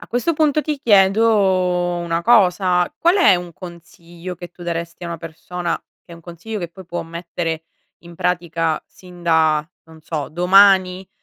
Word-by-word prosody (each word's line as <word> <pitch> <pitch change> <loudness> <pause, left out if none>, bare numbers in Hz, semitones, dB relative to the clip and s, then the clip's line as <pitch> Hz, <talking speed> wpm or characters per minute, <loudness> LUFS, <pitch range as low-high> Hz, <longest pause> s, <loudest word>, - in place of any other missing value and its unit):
A - - -12
questo 245 +8 -1
punto 305 -1 +2
ti 300 -2 -3
chiedo 190 -4 +3
una 170 -1 -2
cosa: 180 -5 +3
qual 345 +3 +3
è 360 - +6
un 175 -1 -5
consiglio 175 0 -10
che 175 0 -10
tu 175 - -14
daresti 170 0 -5
a - - -4
una 170 - -4
persona, 165 +2 -5 0.3
che 170 - -15
è - - -8
un 170 - -14
consiglio 175 +6 -7
che 175 -3 -5
poi 185 +3 -13
può 175 -1 -4
mettere 165 -1 -5 0.4
in 170 0 -13
pratica 170 -2 -1
sin 180 -1 -16
da, 160 -2 +2 0.2
non 160 0 -17
so 155 -2 -5
domani, 185 +2 +4
175 Hz, 170 wpm, -19 LUFS, 170-190 Hz, 0.4 s, è